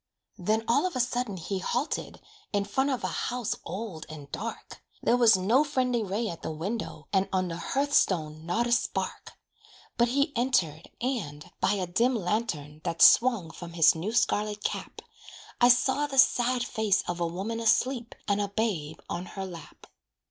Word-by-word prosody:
Then 215 +5 +1
all 280 +10 +3
of 360 - -7
a - - -1
sudden 245 -4 -1
he 190 +3 -3
halted 245 - -2 0.3
In 200 -1 +1
front 265 +7 0
of 260 -3 -2
a - - -2
house 245 -3 -2
old 195 -6 -6
and 145 -2 -10
dark. 230 +3 -6 0.2
There 240 - +4
was 230 -4 +6
no 225 +10 +3
friendly 255 -5 0
ray 210 +3 -2
at 170 -5 -6
the - - -4
window, 195 +8 -5
And 195 0 +2
on 185 -1 0
the 165 - -4
hearth 280 +9 -1
stone 155 -4 +1
not 200 +8 0
a 240 - -2
spark. 235 - -1 0.6
But 235 - +4
he 280 +4 +1
entered, 185 - 0
and, 185 - -3
by 190 +2 +2
a 190 -3 -1
dim 235 +9 +1
lantern 175 -8 -2
That 165 - +1
swung 230 -10 +6
from 170 +1 -9
his 165 -2 +6
new 170 +7 -3
scarlet 210 -2 0
cap, - - -4 0.6
I 245 - +7
saw 265 +4 +3
the 275 -2 -6
sad 250 -2 +4
face 220 -4 +1
of 175 0 -3
a 170 - +1
woman 195 +7 -4
Asleep, 235 +1 +1
and 205 -1 +1
a 205 - 0
babe 195 -8 -2
on 180 +1 -4
her 195 -1 -6
lap. 170 -5 -11
210 Hz, 180 wpm, -28 LUFS, 175-245 Hz, 0.6 s, I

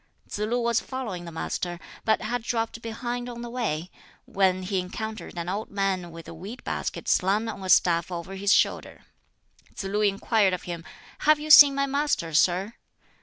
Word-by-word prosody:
Tsz - - -6
lu 220 +4 0
was 235 -1 +2
following 220 -10 -5
the 170 - -8
Master, 175 +2 -4 0.3
but 220 - +2
had 245 +2 -2
dropped 230 0 -2
behind 240 +2 -4
on 240 0 -7
the 240 - -7
way, 185 -9 -3 0.3
when 185 -1 +1
he 190 0 -1
encountered 220 +2 -6
an 170 0 -4
old 200 +4 -3
man 195 -3 -1
with 165 0 -11
a - - -8
weed 195 +10 -9
basket - - -4
slung 200 +5 +2
on 210 -3 -6
a 185 - -5
staff 170 -2 +4
over 175 +2 -5
his 195 +1 0
shoulder. - - +1 0.7
Tsz - - -5
lu 200 +2 -1
inquired 200 0 +2
of 180 - -3
him, 170 -2 -6 0.4
"Have 305 0 +4
you 305 +1 -2
seen 285 -2 +10
my 275 0 +1
Master, 280 - -1
sir?" 185 +7 +2
200 Hz, 185 wpm, -26 LUFS, 180-235 Hz, 0.7 s, seen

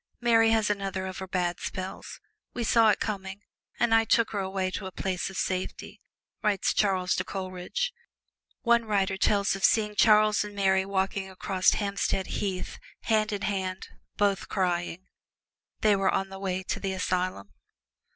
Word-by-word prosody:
Mary 230 -1 +4
has 220 -1 +3
another 195 -2 -3
of 185 -1 -6
her 190 - -6
bad 180 -2 -1
spells 185 -1 -6 0.4
we 240 - -2
saw 225 0 +5
it - - +2
coming, 195 -1 -4 0.4
and 235 -1 +3
I 225 0 +6
took 225 0 +2
her 205 - -2
away 190 -1 -2
to 190 +1 -4
a - - -7
place 185 0 -2
of 190 - -8
safety," 185 0 -3 0.4
writes 205 -3 +1
Charles 185 -3 +1
to - - 0
Coleridge. 190 - -4 0.7
One 235 -1 +3
writer 200 -2 +1
tells 200 0 +2
of 195 - -7
seeing 210 -2 +3
Charles 215 0 +5
and 210 0 -8
Mary 190 -1 +2
walking 190 0 -1
across 185 0 +1
Hampstead 200 -2 -1 0.2
Heath, 190 -3 -3 0.2
hand 215 -1 +1
in 205 -1 -3
hand, 190 -2 -3 0.3
both 200 -2 +1
crying. 180 -1 -1 0.7
They 210 -1 +4
were 195 -1 +2
on 195 0 0
the 195 0 -9
way 190 -1 -2
to - - -3
the 195 -1 -2
asylum. 180 - -2
195 Hz, 165 wpm, -27 LUFS, 185-210 Hz, 0.7 s, I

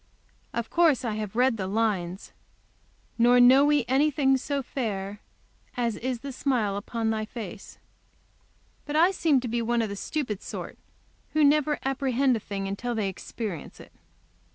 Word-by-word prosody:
Of 235 -1 -4
course 320 -7 +3
I 225 - -1
have 215 -1 -5
read 250 -1 +3
the 190 -2 -3
lines, 195 -4 -1 0.9
"Nor 245 +1 +6
know 255 +3 +7
we 295 -4 +3
anything 270 0 +3
so 275 +1 -2
fair 205 -6 -4 0.6
As 235 -3 0
is 250 -1 -3
the 280 - -6
smile 245 -7 0
upon 220 +2 -2
thy 220 -1 -1
face;" 215 -3 -8 1.1
but 295 - -3
I 340 +4 +5
seem 320 -7 +2
to 250 - -4
be 235 +1 -1
one 235 0 +1
of 220 - -3
the 200 - -5
stupid 220 -2 -3
sort, - - -7 0.5
who 310 - +3
never 295 0 +3
apprehend 265 -1 +1
a - - -2
thing 195 -1 -4
till 240 +3 -3
they 210 -3 0
experience 190 -2 -6
it. - - -13
240 Hz, 160 wpm, -26 LUFS, 210-270 Hz, 1.1 s, know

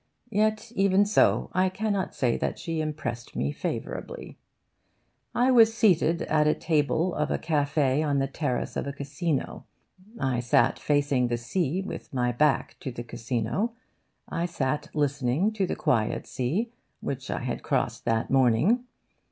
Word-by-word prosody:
Yet 215 +1 +1
even 195 -1 +4
so 205 - +3
I 185 0 +3
cannot 200 -1 -2
say 120 -3 +1
that - - -2
she 165 -2 -3
impressed 150 -6 -4
me 70 - 0
favourably. - - -5 1.0
I 250 +2 +4
was 225 -2 +6
seated 170 -6 +3
at 150 -1 +2
a 150 - +3
table 160 +2 +1
of 150 0 -1
a - - +1
cafe' 145 -3 +1
on 145 -2 +1
the 135 - +2
terrace 135 -2 -2
of - - -2
a 140 - -3
casino. 140 +1 -3 0.5
I 130 -3 0
sat 120 0 +2
facing 145 -4 +2
the 120 0 -1
sea, 165 +8 -1
with 185 - -7
my 125 -1 +1
back 145 +4 +1
to 130 - -5
the 120 0 -6
casino. 120 - -2 0.5
I 170 +1 -2
sat 150 -4 -2
listening 145 - +1
to 200 -4 -1
the - - -2
quiet 110 -4 0
sea, 180 - -2 0.3
which 135 0 -4
I - - -2
had 125 -1 -3
crossed - - -1
that 115 -1 0
morning. 135 - +3
150 Hz, 155 wpm, -27 LUFS, 130-185 Hz, 1.0 s, was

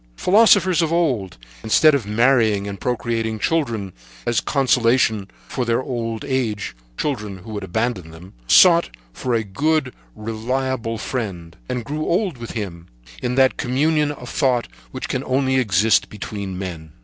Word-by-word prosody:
Philosophers 190 - +4
of 165 -1 0
old, 130 - 0 0.3
instead 155 +8 +5
of 130 -7 0
marrying, 110 -3 +3
and 100 -2 -7
procreating 115 -2 -2 0.9
as 120 -3 +2
a - - -8
consolation 120 -6 +2 0.2
for 125 - -2
their 115 -1 +1
old 115 -2 -4
age 120 - -2 0.2
children, 105 -9 -3
who 110 +4 -11
would 105 -2 -5
abandon 95 -2 -2
them, 80 +3 -13
sought 170 - +6 0.2
for 125 - -2
a 115 - +1
good, 140 +6 0 0.2
reliable 115 +2 -2
friend, 95 -9 -5
and 125 -2 -3
grew 150 +4 -3
old 180 - 0
with 115 - -7
him 90 -6 -6 0.3
in 125 0 -1
that 130 0 +4
communion 150 +3 +1
of 130 -4 -9
thought 125 -2 +1 0.2
which - - -6
can - - -2
only 130 0 +1
exist 105 -2 +3
between 100 -2 -6
men. 85 -5 -7
120 Hz, 150 wpm, -21 LUFS, 105-135 Hz, 0.9 s, sought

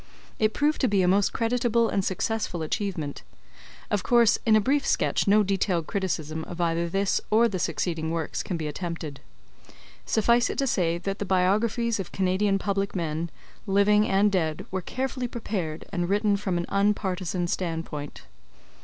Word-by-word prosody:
It 215 0 +2
proved 300 +1 +1
to 260 - +3
be 200 -4 +2
a - - +2
most 195 +2 +3
creditable 235 0 +1
and 195 - 0
successful 190 -2 -2
achievement. 160 -4 -3 0.7
Of 205 - +1
course 235 0 +4
in 220 - +6
a - - +6
brief 275 +6 +1
sketch - - +1
no 210 +2 +5
detailed 190 -4 0
criticism 160 -6 -2
of 175 - -8
either 170 0 0
this 195 +2 +1
or 225 +2 +5
the 195 -5 -3
succeeding 160 -1 -1
works 165 -2 -2
can 180 - -3
be 160 - -4
attempted. 160 -2 -5 0.9
Suffice 235 +2 +3
it - - -4
to 275 - +1
say 170 -9 +1
that 195 +3 -4
the - - -1
biographies 205 +5 +1
of 195 - -5
Canadian 195 +1 +1
public 200 0 -2
men, 165 -1 -2 0.4
living 205 +2 +4
and 200 +2 +3
dead, 160 -5 -1
were 190 0 -2
carefully 255 +4 -3
prepared, 190 -10 -4
and 175 -2 -1
written 205 +1 +2
from 190 -3 -1
an 170 - -2
un 200 +1 +3
partisan 185 -3 -2
standpoint. 165 -4 -4
195 Hz, 170 wpm, -26 LUFS, 170-215 Hz, 0.9 s, in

